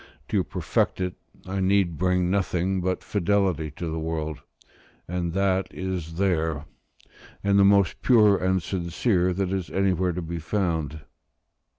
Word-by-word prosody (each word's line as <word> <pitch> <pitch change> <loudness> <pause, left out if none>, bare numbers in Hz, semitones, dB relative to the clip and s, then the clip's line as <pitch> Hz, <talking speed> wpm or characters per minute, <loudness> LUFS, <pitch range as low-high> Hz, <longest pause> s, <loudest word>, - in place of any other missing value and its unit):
To - - +2
perfect - - -1
it, 90 -1 -1 0.3
I 95 +1 -3
need 95 -3 +2
bring 90 0 +2
nothing 95 -1 0
but 90 +1 -1
fidelity 95 -5 +1
to 85 - -5
the 80 0 -3
work; 80 -1 -3 0.7
and 85 -1 -2
that 95 0 +1
is 90 -3 -4
there, 80 -5 0 0.8
and 100 0 +3
the - - +6
most 100 -2 +4
pure 110 -5 +5
and 95 -1 0
sincere 90 +2 0
that 95 0 -1
is 95 -3 -2
anywhere 95 -2 +1
to 90 +1 -4
be 85 +1 -4
found. 80 -4 -2
90 Hz, 145 wpm, -25 LUFS, 85-95 Hz, 0.8 s, the